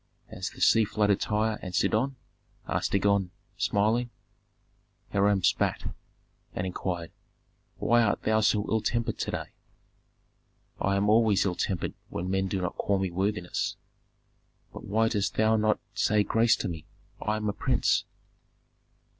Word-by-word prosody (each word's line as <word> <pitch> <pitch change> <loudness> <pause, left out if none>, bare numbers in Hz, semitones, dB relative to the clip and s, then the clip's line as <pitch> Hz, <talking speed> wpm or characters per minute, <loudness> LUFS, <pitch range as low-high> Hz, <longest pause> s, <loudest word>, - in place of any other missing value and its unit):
"Has - - -4
the - - -13
sea 115 - +5
flooded 105 -1 +1
Tyre 110 +1 0
and 90 -1 -6
Sidon?" 130 +8 +1 0.5
asked - - -1
Dagon, 100 -1 +2 0.3
smiling. 110 +4 +1 1.0
Hiram 100 -1 +3
spat, - - +1 0.6
and 90 - -2
inquired, 90 -2 -4 0.7
"Why 120 0 +3
art 110 -3 +1
thou 110 0 +2
so 105 -1 +2
ill 110 -1 +1
tempered 115 +1 -1
to - - -2
day?" - - -4 1.3
"I 100 0 +1
am 100 +1 +1
always 110 -2 +4
ill 95 - +1
tempered 90 0 -2 0.2
when 90 +2 -3
men 95 0 +1
do 95 0 -2
not 90 - -3
call 100 - +1
me 95 -2 -1
worthiness." 95 0 -1 1.0
"But - - -9
why 110 +3 +2
dost 105 -3 -1
thou 110 0 +3
not 110 0 +2
say 105 -1 +2
grace 115 +2 +3
to - - -3
me? 80 -4 -6 0.3
I 105 - 0
am 105 0 -3
a 105 - 0
prince." - - +1
105 Hz, 145 wpm, -28 LUFS, 95-110 Hz, 1.3 s, sea